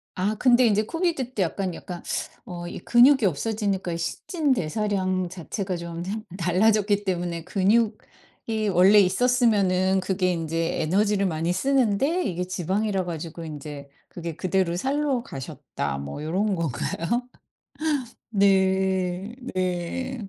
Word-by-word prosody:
아 200 +4 0
근데 245 +1 +5
이제 215 0 +3
코비드 325 -5 -1
때 200 - -1
약간 185 +1 -2
약간 175 0 -8 0.4
어 175 -1 -6
이 - - -6
근육이 245 +5 +5
없어지니까 195 +1 -1
신진대사량 190 - -1
자체가 185 +2 -4
좀 170 0 -5 0.3
달라졌기 205 +3 +2
때문에 175 -3 -2
근육이 215 +1 -1
원래 190 +4 +6
있었으면은 195 -3 +3
그게 185 -1 0
인제 165 -1 -1
에너지를 200 +5 +2
많이 165 -1 0
쓰는데 270 - +2
이게 180 -4 -2
지방이라 190 +2 -1
가지고 165 0 -6
인제 145 -2 -8 0.2
그게 170 -2 -6
그대로 185 -1 0
살로 270 +4 0
가셨다 130 - -5
뭐 70 - -6
요런 195 +7 0
건가요? 170 - -2 1.0
네 190 0 +2 0.2
네. 185 +6 -2
190 Hz, 270 characters per minute, -25 LUFS, 175-215 Hz, 1.0 s, 원래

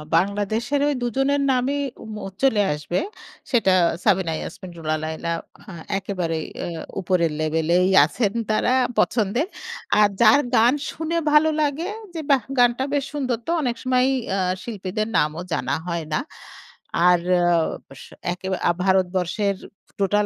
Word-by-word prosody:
বাংলাদেশের 205 +9 0
ওই 295 - +2
দুজনের 270 +4 +1
নামই 260 +3 0 0.2
ওম 220 -1 -8 0.3
চলে 245 -6 +4
আসবে। 150 +4 -2 0.5
সেটা 220 -7 +3 0.3
সাবিনা 190 -5 +2
ইয়াসমিন, 185 -2 -8
রুনা 155 -1 -1
লায়লা, 160 +1 -3 0.3
হ্যাঁ 170 -3 -9 0.2
একেবারেই 175 -5 -3 0.2
এ্যা 170 -2 -5 0.2
উপরের 175 -3 +1
লেভেলেই 160 +3 +2 0.2
আছেন 200 +6 -1 0.2
তারা 230 +3 +2 0.3
পছন্দের। 235 - +1 0.5
আর 210 -1 +6
যার 290 - +7
গান 235 +3 +5 0.2
শুনে 325 +1 -3
ভালো 305 +1 +5
লাগে 300 +5 -1 0.2
যে 325 - -4
বাহ! 270 -5 +4
গানটা 245 +1 +4
বেশ 285 -2 +1
সুন্দর 260 -5 -1
তো - - 0
অনেক 245 -4 -1
সময়ই 255 +1 +2 0.2
এ্যা 195 - 0 0.2
শিল্পীদের 215 -1 -3
নামও 155 +3 0
জানা - - 0
হয় 170 -2 -2
না। - - +2 0.9
আর 180 -1 +5 0.2
এ্যা 175 -1 +3 0.5
স - - -10 0.3
একে 190 +1 -8 0.4
ভারতবর্ষের 190 +1 +1 0.4
টোটাল 205 +2 +2
205 Hz, 135 wpm, -23 LUFS, 175-255 Hz, 0.9 s, যার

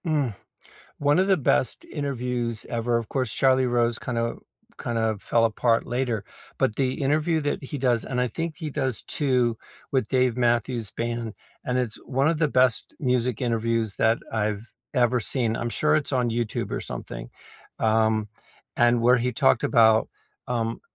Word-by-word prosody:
Mm. 145 -9 0 0.6
One 145 +3 +3
of 190 +1 +3
the 195 - +5
best 130 -4 +1
interviews 125 -5 -3
ever 120 0 0
of 115 -2 -6
course, 130 -5 -1
Charlie 130 -1 +3
Rose 120 -1 +1
kinda 115 -2 -2 0.4
kind 120 -1 -3
of 110 -2 0
fell 115 -1 +2
apart 115 +1 +2
later, 120 -4 -1 0.3
but 105 - +1
the 130 -2 +1
interview 155 +4 +2
that 145 -1 -2
he 140 +2 -5
does 125 -3 +1
and 125 -1 -2
I 125 - +1
think 165 +6 -4
he 160 -3 -4
does 130 -5 -2
2 125 -5 +1 0.4
with 130 -5 +1
Dave 130 -2 +2
Matthews 120 -2 0
band, 115 -2 -3 0.3
and 125 0 0
it's 120 -4 -2
one 135 +2 +2
of 165 -1 +1
the 155 - +3
best 130 -3 +2
music 125 -3 0
interviews 115 -3 0
that 110 +1 +3
I've 105 0 -2 0.2
ever 125 -1 +3
seen. 115 -1 -1
I'm 120 - -2
sure 155 +5 +2
it's 150 -2 -2
on 125 -2 +1
YouTube 115 -1 -2
or - - -2
something, - - -7 0.5
um, 110 -1 +2 0.5
and 120 0 +4
where 125 +2 +6
he 125 +1 -1
talked 65 - +3
about, 110 -1 +5 0.4
um, 115 -2 -2
120 Hz, 170 wpm, -25 LUFS, 115-130 Hz, 0.6 s, where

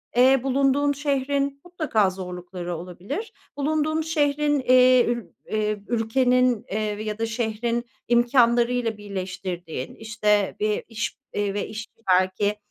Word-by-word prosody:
eee, 260 +1 +5
bulunduğun 275 +2 +2
şehrin 280 0 -1
mutlaka 305 - +1
zorlukları 180 -1 -6
olabilir. 200 - -6 0.2
Bulunduğun 310 +2 0
şehrin, 295 -2 +1
eee, 255 -1 +5
ül 235 -1 -1 0.3
eee, 215 -1 0
ülkenin, 245 +1 +2
eee, 215 - 0 0.2
ya 215 -1 -3
da 225 - +1
şehrin 230 +1 -2 0.2
imkânlarıyla 240 -1 +3
birleştirdiğin, 185 -7 -5
işte, 210 -2 0
bir 210 0 0
iş 230 +1 -4 0.2
ve 205 0 -1
iş 215 +1 -6 0.2
belki 185 +3 +2
235 Hz, 115 wpm, -24 LUFS, 205-270 Hz, 0.3 s, eee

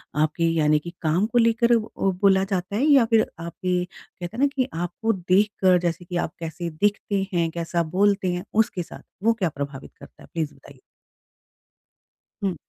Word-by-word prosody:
आपके, 155 +2 +1
यानी 150 -2 +3
कि 170 +3 -9
काम 165 +5 +2
को 240 +2 -1
लेकर 235 +1 +4
अ, - - +5 0.2
बोला 190 0 +3
जाता 195 0 -2
है 250 - +1
या 275 -6 +6
फिर 225 -1 +3
आपके, 180 +2 -2
कहते 180 +3 -10
हैं - - -4
ना - - +6
कि 260 -1 +1
आपको 175 +7 -1
देखकर, 185 0 +3
जैसे 175 0 -2
कि 175 - -6
आप 170 - -2
कैसे 170 +1 -5
दिखते 200 +3 0
हैं, 170 -1 +1
कैसा 170 0 -1
बोलते 200 -3 +3
हैं, 180 +1 -3
उसके 210 -5 +1
साथ, - - -12 0.2
वो 230 +1 +4
क्या 190 -7 -1
प्रभावित 140 -1 -7
करता - - -15
है? - - -15
प्लीज़ 160 -3 -2
बताइए। - - -17 1.6
हुँ। 190 -3 0
180 Hz, 180 wpm, -24 LUFS, 170-205 Hz, 1.6 s, या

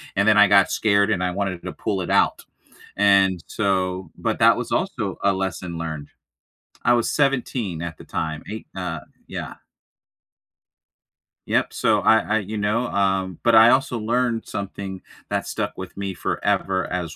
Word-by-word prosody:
and 100 +2 +2
then 110 -1 +5
I 105 -1 +7
got 100 -2 +5
scared 100 -1 +2
and 90 -4 0
I 90 - 0
wanted 95 -2 -3
to - - -5
pull 95 -2 -2
it 90 - -5
out, - - +2 0.5
and 95 -3 +4
so 95 -3 -1
but - - -2
that - - +6
was - - -5
also - - -2
a 100 - +4
lesson 95 -2 -4
learned. 80 -3 -5 0.8
I 120 - +5
was 120 -1 +1
17 125 - 0
at 85 -1 -5
the - - -12
time, 80 -1 -4
8, 110 - -7
uh, 90 -4 -4 0.3
yeah. - - -6 1.9
Yep, - - +1
so - - +1
I 110 - +5
I, 110 0 0
you 105 +2 -5
know, 105 +4 0
um, 95 -3 0
but 115 -1 +4
I 110 +1 +8
also 130 -1 +2
learned 115 +1 0
something 100 -1 -6 0.3
that - - -2
stuck - - -3
with 95 - -8
me 100 -1 -4
forever 95 +1 -1
as 85 -3 -3
100 Hz, 170 wpm, -22 LUFS, 90-110 Hz, 1.9 s, I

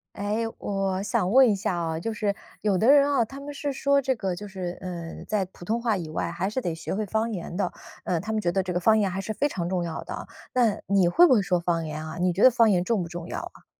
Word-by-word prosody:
哎， 210 +3 -1
我 195 -1 -1
想 205 -3 0
问 260 -1 +7
一 205 - +2
下 190 -1 -1
啊， 165 -2 -2
就 225 +7 -3
是 210 -1 0 0.3
有 200 -3 +1
的 220 - +3
人 285 -1 +7
啊， 275 -5 +3
他 270 +5 -10
们 290 +1 -7
是 285 0 -3
说 280 +1 +2
这 265 -1 0
个 190 -6 -3
就 205 - -7
是， 185 -3 -5
呃， 170 -3 -6
在 210 -3 0
普 180 -1 -14
通 230 +5 -1
话 225 -3 +1
以 170 -4 -5
外 155 - -2
还 190 +2 -2
是 215 +6 -2
得 175 -9 -2
学 160 +3 -4
会 215 +2 -1
方 220 +3 -1
言 175 -3 -5
的。 200 - -1 0.3
呃， 175 -3 0
他 215 - -6
们 220 - 0
觉 175 -4 0
得 190 - +1
这 185 -1 -3
个 175 - 0
方 220 +5 +4
言 205 -3 +2
还 190 - -3
是 215 +2 -4
非 290 - +1
常 175 -10 -3
重 180 -1 -1
要 170 -2 -4
的， - - -7 0.2
那 235 -5 +2
你 195 -3 +3
会 345 - +6
不 - - +4
会 220 -5 +5
说 180 -2 +1
方 170 -1 -1
言 155 0 -5
啊？ 160 +1 -7
你 180 0 +2
觉 190 +7 +2
得 260 - +10
方 230 -2 +5
言 180 -2 +2
重 220 -4 +1
不 170 - -5
重 175 0 -7
要 - - -4
啊？ - - -10
195 Hz, 310 characters per minute, -26 LUFS, 175-225 Hz, 0.3 s, 得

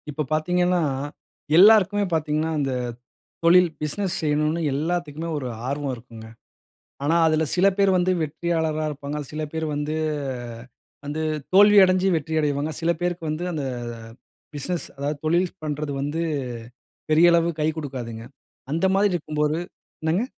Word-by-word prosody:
இப்ப 150 +1 -3
பாத்தீங்கன்னா, 180 +3 +2 0.8
எல்லாருக்குமே 205 +1 +6
பாத்தீங்கன்னா, 155 0 0
இந்த 135 -2 -1 0.7
தொழில், 175 +1 +6
பிஸ்னஸ் 190 +4 -2
செய்யணும்னு 150 +2 +1
எல்லாத்துக்குமே 160 +1 -2
ஒரு 135 -3 -4 0.2
ஆர்வம் 140 0 -2
இருக்குங்க, 115 -2 -12 0.8
ஆனா 155 +4 +2
அதில 160 0 +2
சில 190 +2 +4
பேர் 195 -1 +4
வந்து 180 +1 +2
வெற்றியாளரா 160 0 -1
இருப்பாங்க, 145 0 -5
சில 155 +1 -4
பேர் 160 0 -2
வந்து 150 +1 -2 1.1
வந்து 150 +2 -3 0.3
தோல்வி 205 +2 +7
அடைஞ்சு 185 0 +3
வெற்றி 160 0 -3
அடைவாங்க, 145 0 0
சில 165 +1 +2
பேருக்கு 175 -1 -2
வந்து 155 +3 -3
அந்த 150 -3 -3 0.9
பிஸ்னஸ் 170 +4 -3
அதாவது 145 +2 -2
தொழில் 175 +3 +2
பண்ணுறது 150 -1 -3
வந்து 145 +3 -2 0.9
பெரிய 170 +3 +6
அளவு 170 0 +3
கை 155 - +2
குடுக்காதுங்க, 125 -7 -6 0.5
அந்த 165 +5 +1
மாரி 200 0 +3
இருக்கும்போது 150 -2 -1 0.4
என்னங்க? 160 +7 +1
155 Hz, 130 wpm, -24 LUFS, 150-175 Hz, 1.1 s, தோல்வி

